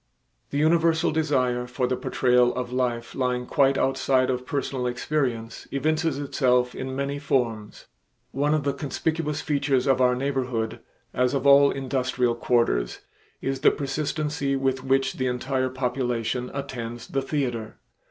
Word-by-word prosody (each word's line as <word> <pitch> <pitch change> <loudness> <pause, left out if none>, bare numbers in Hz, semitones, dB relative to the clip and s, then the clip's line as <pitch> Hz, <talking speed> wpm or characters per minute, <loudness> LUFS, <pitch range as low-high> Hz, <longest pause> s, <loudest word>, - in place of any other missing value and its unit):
The 140 - -3
universal 165 +2 +3
desire 130 -6 0
for 125 +1 -1
the 125 +1 0
portrayal 125 -1 +2
of 125 -1 -4
life 120 -2 -1
lying 125 -1 -1
quite 135 +1 +3
outside 130 -1 +2
of 125 0 -4
personal 135 -3 -2
experience 125 -3 -2
evinces 155 +1 0
itself 125 -3 +1
in 130 0 -5
many 140 +1 -2
forms. 115 -7 -2 0.5
One 145 +3 +1
of 155 - -1
the 140 0 0
conspicuous 150 +1 -2
features 140 -4 +1
of 135 -1 +3
our 125 0 +4
neighborhood, 125 -4 -2 0.3
as 125 +2 +1
of 135 0 -1
all 140 0 +7
industrial 130 -2 0
quarters, 115 - 0 0.4
is 135 0 -1
the - - +6
persistency 145 0 -2
with 135 -1 0
which 135 0 +1
the 130 - 0
entire 130 +1 -1
population 125 -1 -2
attends 120 -4 -5
the 135 - 0
theater. 125 -6 -3
130 Hz, 140 wpm, -25 LUFS, 125-140 Hz, 0.5 s, all